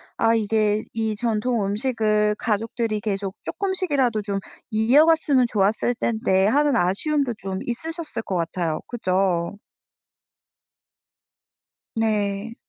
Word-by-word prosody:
아 225 0 +3
이게 215 -1 +1
'이 220 -1 -1
전통 225 0 0
음식을 210 -1 +1
가족들이 225 0 -1
계속 195 -2 -3
쪼끔씩이라도 290 - 0
좀 200 -1 -2 0.3
이어갔으면 270 +4 +4
좋았을 215 +4 +1
텐데.' 220 -5 +1
하는 285 +5 +3
아쉬움도 245 - +1
좀 190 0 -4
있으셨을 320 +2 -4
것 190 - -3
같아요. 165 -1 -1
그죠? 185 -4 0 2.4
네. 215 -1 -1
220 Hz, 235 characters per minute, -23 LUFS, 200-245 Hz, 2.4 s, 이어갔으면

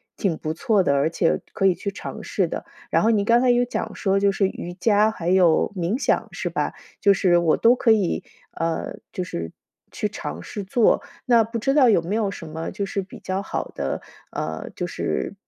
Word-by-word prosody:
挺 180 -6 -1
不 155 - -3
错 210 +1 +2
的， 140 - +2
而 140 +3 +2
且 165 0 +1
可 195 - 0
以 190 - +6
去 200 - -4
尝 195 - -7
试 - - 0
的。 - - -5 0.3
然 - - +3
后 225 - +4
你 205 -3 +2
刚 235 +2 +4
才 255 - +3
有 245 0 +4
讲 245 - -4
说 195 -1 +1
就 200 0 +3
是 195 0 +1
瑜 175 -2 -6
伽 210 +3 +3
还 170 -5 -3
有 180 +1 +4
冥 185 +6 -1
想 - - +1
是 - - -3
吧？ - - -1 0.3
就 200 - +6
是 175 -2 +3
我 165 -2 +2
都 235 +2 +5
可 245 - +1
以， 205 -6 +2 0.3
呃， 165 -1 -3 0.2
就 185 - -3
是 85 - -5 0.4
去 - - -2
尝 80 +4 -6
试 205 - -6
做， 215 +4 +3 0.2
那 235 -2 +5
不 230 +2 -4
知 270 +5 +1
道 270 -5 +6
有 200 -6 +4
没 185 +5 -2
有 215 -3 +1
什 165 -4 -8
么， 160 +1 -5
就 200 - -3
是 195 - -2
比 190 - -11
较 190 +1 -3
好 200 - -4
的， - - -2 0.3
呃， 80 0 -4
就 180 - -2
是 175 - -3
195 Hz, 235 characters per minute, -23 LUFS, 170-220 Hz, 0.4 s, 以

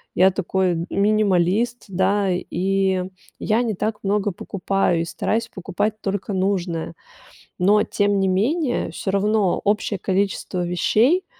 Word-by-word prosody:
я 190 +2 +5
такой 185 -2 -1
минималист, 205 +2 +1
да, 195 +1 +1
и 190 +1 0 0.4
я 220 +3 +1
не 225 -3 -1
так 210 +3 -2
много 205 +1 0
покупаю 190 -1 -1
и - - -2
стараюсь 225 +6 -2
покупать 205 +3 -3
только 200 +1 -3
нужное. 185 -4 -1 0.7
Но 205 +3 +4
тем 205 -1 0
не 190 - +2
менее, 245 - 0
всё 195 - -3
равно 200 -1 +1
общее 205 0 0
количество 190 -1 -1
вещей, 230 - +2
195 Hz, 125 wpm, -22 LUFS, 185-210 Hz, 0.7 s, я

